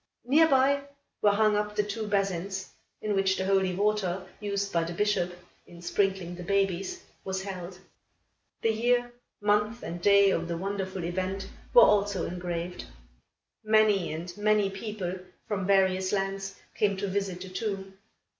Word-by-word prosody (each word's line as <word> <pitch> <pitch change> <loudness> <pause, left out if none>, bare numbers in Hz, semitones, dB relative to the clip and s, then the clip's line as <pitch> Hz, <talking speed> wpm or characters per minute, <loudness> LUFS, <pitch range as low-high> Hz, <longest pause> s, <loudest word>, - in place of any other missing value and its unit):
Near 305 +6 +5
by, 275 0 +4 0.4
were 210 - +5
hung 210 +1 +3
up 210 0 -1
the 210 - +2
two 210 +1 -4
basins, 195 -1 -1 0.3
in 215 -1 0
which 190 -1 +2
the 190 - -1
holy 190 -2 +2
water, 195 -2 0
used 200 -1 -2
by 170 -1 +2
the 170 +1 -4
Bishop, 205 -3 +1 0.4
in 170 - -13
sprinkling 185 0 0
the 180 - -8
babies, 195 0 0 0.2
was 190 0 -3
held. 185 -2 -6 0.9
The 225 - +4
year, 240 +2 +1 0.3
month 210 +3 +1
and 170 +1 -5
day 200 0 +6
of 170 -1 -1
the 170 -1 -2
wonderful 190 0 -3
event 185 +3 -2 0.3
were - - +10
also 200 -3 +3
engraved. 175 0 -4 0.8
Many 215 -4 +3
and 170 +3 -6
many 210 -1 +2
people 195 -3 -4 0.3
from 195 -3 -2
various 190 -1 +3
lands 195 0 -2 0.2
came 200 -2 +1
to 200 +1 -2
visit 195 -2 -2
the 190 - -7
tomb. 195 -1 -4
195 Hz, 155 wpm, -28 LUFS, 185-210 Hz, 0.9 s, were